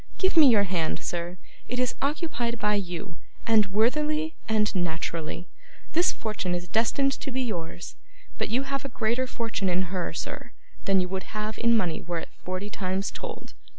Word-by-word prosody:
Give 380 Hz, -1 st, +3 dB
me 315 Hz, -4 st, +9 dB
your 220 Hz, -5 st, +6 dB
hand, 175 Hz, -4 st, 0 dB
sir; 175 Hz, +1 st, -3 dB, 0.3 s
it 250 Hz, -, -2 dB
is 250 Hz, -1 st, +2 dB
occupied 280 Hz, -5 st, 0 dB
by 210 Hz, -1 st, +2 dB
you, 180 Hz, -3 st, -3 dB, 0.3 s
and 220 Hz, -3 st, +5 dB
worthily 300 Hz, +10 st, +2 dB, 0.2 s
and 215 Hz, -1 st, +3 dB
naturally. 170 Hz, -1 st, -2 dB, 0.5 s
This 345 Hz, +3 st, +5 dB
fortune 205 Hz, -5 st, -2 dB
is 175 Hz, 0 st, -4 dB
destined 235 Hz, +7 st, +3 dB
to -, -, -4 dB
be 260 Hz, 0 st, 0 dB
yours, 175 Hz, -6 st, -4 dB, 0.4 s
but -, -, 0 dB
you 250 Hz, +5 st, +2 dB
have 275 Hz, +1 st, -2 dB
a 275 Hz, -, -4 dB
greater 240 Hz, +2 st, +1 dB
fortune 225 Hz, -6 st, -1 dB
in 180 Hz, +1 st, 0 dB
her, 180 Hz, -2 st, -1 dB
sir, -, -, -5 dB, 0.3 s
than 195 Hz, -1 st, +4 dB
you 180 Hz, -, -1 dB
would 190 Hz, +3 st, -4 dB
have 215 Hz, 0 st, -2 dB
in 235 Hz, 0 st, +5 dB
money 175 Hz, -7 st, 0 dB
were 170 Hz, 0 st, -3 dB
it -, -, -5 dB
forty 185 Hz, +3 st, -3 dB
times 190 Hz, 0 st, -1 dB
told. -, -, -7 dB
210 Hz, 180 wpm, -27 LUFS, 180-250 Hz, 0.5 s, me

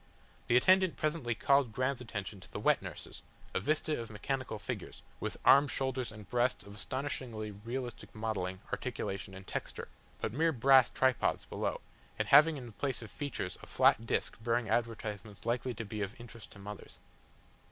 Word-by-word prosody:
The 120 Hz, -, +5 dB
attendant 185 Hz, +6 st, +5 dB
presently 150 Hz, -7 st, 0 dB
called 140 Hz, 0 st, +3 dB
Graham's 130 Hz, +2 st, 0 dB
attention 100 Hz, -4 st, -5 dB
to 95 Hz, -, -14 dB
the -, -, -4 dB
wet -, -, +3 dB
nurses, -, -, -8 dB, 0.3 s
a -, -, +1 dB
vista 150 Hz, +6 st, 0 dB
of 115 Hz, -, -7 dB
mechanical 120 Hz, +2 st, -3 dB
figures, -, -, -6 dB, 0.2 s
with -, -, -3 dB
arms, 140 Hz, +1 st, +7 dB
shoulders, 130 Hz, -3 st, -1 dB
and 105 Hz, -2 st, -11 dB
breasts 125 Hz, +1 st, +1 dB
of 100 Hz, -, -11 dB
astonishingly 120 Hz, -3 st, -4 dB
realistic 120 Hz, +5 st, -6 dB
modelling, 95 Hz, -4 st, -2 dB
articulation, 95 Hz, 0 st, -3 dB
and 95 Hz, 0 st, -10 dB
texture, -, -, -4 dB, 0.3 s
but 105 Hz, -, -2 dB
mere 160 Hz, +4 st, +2 dB
brass 130 Hz, 0 st, +6 dB
tripods 130 Hz, -1 st, +1 dB
below, -, -, -2 dB, 0.4 s
and -, -, -1 dB
having 155 Hz, 0 st, +8 dB
in 130 Hz, -, -7 dB
the 120 Hz, -, -9 dB
place 130 Hz, +2 st, -3 dB
of 110 Hz, -, -10 dB
features 140 Hz, -11 st, -4 dB
a -, -, -11 dB
flat 115 Hz, +2 st, +4 dB
disc -, -, 0 dB
bearing 115 Hz, -2 st, +1 dB
advertisements 110 Hz, -3 st, -2 dB
likely 120 Hz, +1 st, 0 dB
to 115 Hz, +1 st, -4 dB
be 105 Hz, +1 st, -5 dB
of 105 Hz, +6 st, -4 dB
interest 120 Hz, -1 st, -11 dB
to -, -, -14 dB
mothers. 100 Hz, 0 st, -9 dB
120 Hz, 175 wpm, -33 LUFS, 105-135 Hz, 0.4 s, having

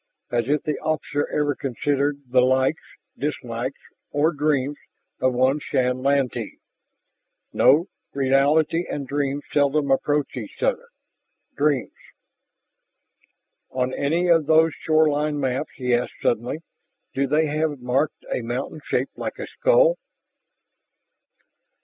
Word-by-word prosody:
As 120 Hz, -1 st, +1 dB
if 150 Hz, +1 st, +1 dB
the 150 Hz, -2 st, -2 dB
officer 150 Hz, -2 st, -1 dB
ever 145 Hz, -1 st, 0 dB
considered 140 Hz, +2 st, -1 dB
the 125 Hz, 0 st, +4 dB
likes, 130 Hz, +4 st, +2 dB, 0.3 s
dislikes 130 Hz, -3 st, -4 dB, 0.3 s
or 150 Hz, +3 st, +2 dB
dreams 145 Hz, -2 st, 0 dB, 0.4 s
of 130 Hz, -1 st, +1 dB
one 130 Hz, +4 st, +3 dB
Shann 125 Hz, -3 st, 0 dB
Lantee. 135 Hz, -2 st, 0 dB, 1.0 s
No, 155 Hz, +5 st, +5 dB, 0.3 s
reality 140 Hz, +5 st, +2 dB
and 140 Hz, -2 st, -4 dB
dreams 140 Hz, +1 st, -1 dB
seldom 145 Hz, 0 st, +2 dB
approached 145 Hz, +1 st, +1 dB
each -, -, -7 dB
other. 485 Hz, -1 st, 0 dB, 0.7 s
Dreams.... 145 Hz, -3 st, +1 dB, 1.8 s
"On 130 Hz, 0 st, -1 dB
any 165 Hz, +5 st, 0 dB
of 165 Hz, -4 st, +4 dB
those 160 Hz, 0 st, +5 dB
shoreline 150 Hz, -1 st, +1 dB
maps," 135 Hz, +2 st, -2 dB
he 125 Hz, -2 st, -1 dB
asked 120 Hz, +1 st, 0 dB
suddenly, 120 Hz, +7 st, -1 dB, 0.5 s
"do 140 Hz, +1 st, 0 dB
they 155 Hz, +3 st, +2 dB
have 150 Hz, -1 st, -1 dB
marked 130 Hz, -, -1 dB
a -, -, -1 dB
mountain -, -, -4 dB
shaped -, -, -2 dB
like -, -, -4 dB
a -, -, -5 dB
skull?" -, -, +3 dB
145 Hz, 120 wpm, -23 LUFS, 130-155 Hz, 1.8 s, No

